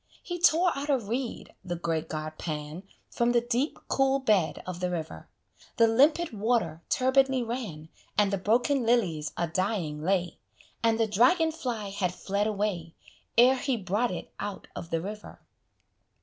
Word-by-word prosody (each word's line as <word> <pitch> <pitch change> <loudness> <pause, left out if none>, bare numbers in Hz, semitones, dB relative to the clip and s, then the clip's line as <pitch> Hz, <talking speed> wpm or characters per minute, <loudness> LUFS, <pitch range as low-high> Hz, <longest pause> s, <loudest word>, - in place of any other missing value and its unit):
He 350 0 -5
tore 345 +1 +4
out 280 +2 -4
a 280 - +4
reed, 235 +2 -4
the 175 -2 -3
great 165 -1 -2
god 155 0 -5
Pan 150 +1 -5 0.3
From 240 0 +1
the 240 - +5
deep, 245 +5 -1
cool 270 0 +2
bed 210 -11 +1
of 185 -1 -5
the 180 0 -1
river: 160 - -5 0.5
The 230 - +6
limpid 290 +7 +3
water 210 -7 0
turbidly 260 0 +3
ran, 215 -11 -5 0.3
And 205 -1 +3
the 200 - 0
broken 245 +7 +2
lilies 185 -11 +1
a 170 - 0
dying 175 -4 -2
lay, 180 0 0 0.4
And 225 -1 +2
the 225 - +4
dragon 255 - +3
fly 245 -10 -4
had 185 -3 -1
fled 200 +2 -1
away, 200 -6 -2 0.4
Ere 255 +3 +7
he 260 -1 -1
brought 205 +4 0
it 180 - -6
out 205 -1 -5
of 165 - -7
the 165 -2 -1
river. 210 +3 -8
210 Hz, 165 wpm, -28 LUFS, 175-250 Hz, 0.5 s, Ere